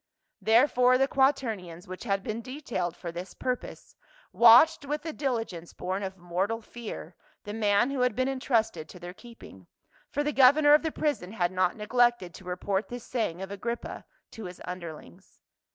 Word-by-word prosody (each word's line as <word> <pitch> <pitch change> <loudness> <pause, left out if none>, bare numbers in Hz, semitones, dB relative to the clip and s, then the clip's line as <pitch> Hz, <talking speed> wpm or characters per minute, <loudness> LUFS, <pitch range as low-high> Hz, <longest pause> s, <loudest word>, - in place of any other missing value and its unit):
Therefore 250 +2 +4
the 270 +1 +3
quaternions, 225 - 0
which 185 +5 -8
had 195 -3 0
been 220 +2 -4
detailed 235 - -4
for 170 - -6
this 175 +3 -8
purpose, 255 -1 -5 0.4
watched 245 +8 +7
with 295 +1 -3
the 320 -1 -4
diligence 225 - -3
born 185 +2 -3
of 190 -1 -5
mortal 185 +6 -2
fear 220 -7 -8 0.3
the 205 - -6
man 215 +3 +2
who 275 - -3
had 250 -3 +2
been 255 +2 +1
entrusted 230 - 0
to 180 - -11
their 175 +1 -8
keeping; 235 +3 -14 0.4
for 290 - -1
the 295 0 -1
governor 290 +3 +6
of 300 - +6
the 320 - -2
prison 285 -13 -2
had 175 -5 0
not 185 -1 +1
neglected 240 -4 +1
to 190 - -12
report 190 +3 -2
this 245 -1 -7
saying 190 -7 -2
of 195 - -7
Agrippa 235 +4 -5 0.3
to 225 -3 -8
his 180 0 -9
un 180 0 -5
derlings. 170 +3 -11
225 Hz, 175 wpm, -28 LUFS, 185-255 Hz, 0.4 s, watched